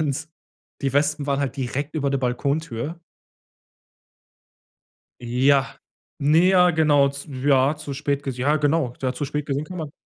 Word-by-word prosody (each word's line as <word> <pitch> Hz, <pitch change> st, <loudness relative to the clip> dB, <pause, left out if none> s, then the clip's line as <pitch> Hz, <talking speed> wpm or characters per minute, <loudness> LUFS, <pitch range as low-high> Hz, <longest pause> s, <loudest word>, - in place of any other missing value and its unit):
Und 155 Hz, +1 st, -2 dB, 0.5 s
die 135 Hz, -1 st, 0 dB
Wespen 145 Hz, 0 st, +1 dB
waren 140 Hz, -1 st, 0 dB
halt 140 Hz, -2 st, -2 dB
direkt 140 Hz, +4 st, -3 dB
über 140 Hz, -3 st, 0 dB
der 140 Hz, -, 0 dB
Balkontür. 140 Hz, +3 st, -2 dB, 2.2 s
Ja. 135 Hz, +3 st, +2 dB, 0.4 s
Ne, 155 Hz, +5 st, +4 dB
ja, 180 Hz, -2 st, +5 dB
genau, 145 Hz, -3 st, +4 dB
z 140 Hz, +1 st, -9 dB
ja, 135 Hz, +1 st, +2 dB
zu 150 Hz, -2 st, -7 dB
spät 140 Hz, 0 st, -2 dB
ges 130 Hz, -2 st, -4 dB
ja, 145 Hz, +4 st, +2 dB
genau, 145 Hz, -4 st, +1 dB
ja 130 Hz, 0 st, 0 dB
zu 145 Hz, -, -4 dB
spät 150 Hz, +1 st, -3 dB
gesehen 140 Hz, +1 st, -2 dB
kann 180 Hz, +3 st, -8 dB
man 155 Hz, -3 st, -5 dB
140 Hz, 155 wpm, -23 LUFS, 135-150 Hz, 2.2 s, ja